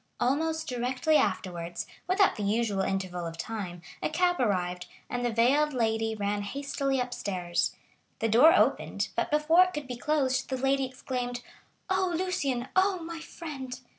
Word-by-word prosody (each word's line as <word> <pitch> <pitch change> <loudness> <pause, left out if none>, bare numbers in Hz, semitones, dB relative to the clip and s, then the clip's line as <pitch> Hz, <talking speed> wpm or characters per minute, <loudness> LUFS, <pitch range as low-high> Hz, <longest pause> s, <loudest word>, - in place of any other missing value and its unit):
Almost 320 +5 0
directly 255 +4 0
afterwards, 180 - -1 0.2
without 380 +2 +4
the - - -5
usual 205 -1 +1
interval 185 -3 -2
of 165 0 -7
time, 180 -4 -5 0.2
a - - 0
cab 355 +3 +1
arrived, 180 -6 0 0.2
and 245 0 -2
the 240 - +2
veiled 275 +7 +3
lady 225 -2 0
ran 205 0 -1
hastily 275 +4 -2
upstairs. 190 -8 -1 0.4
The 225 - 0
door 245 +9 +7
opened, 370 - +2
but - - 0
before 300 +4 +5
it 365 - -6
could 295 -1 -4
be 250 -1 -5
closed, 270 -2 0
the 260 - -1
lady 270 +1 +2
exclaimed: 250 -1 -4 0.4
"Oh, 375 -2 +1
Lucien—oh, 365 +2 0
my 335 0 -6
friend!" 290 -6 -7
250 Hz, 150 wpm, -29 LUFS, 210-305 Hz, 0.4 s, door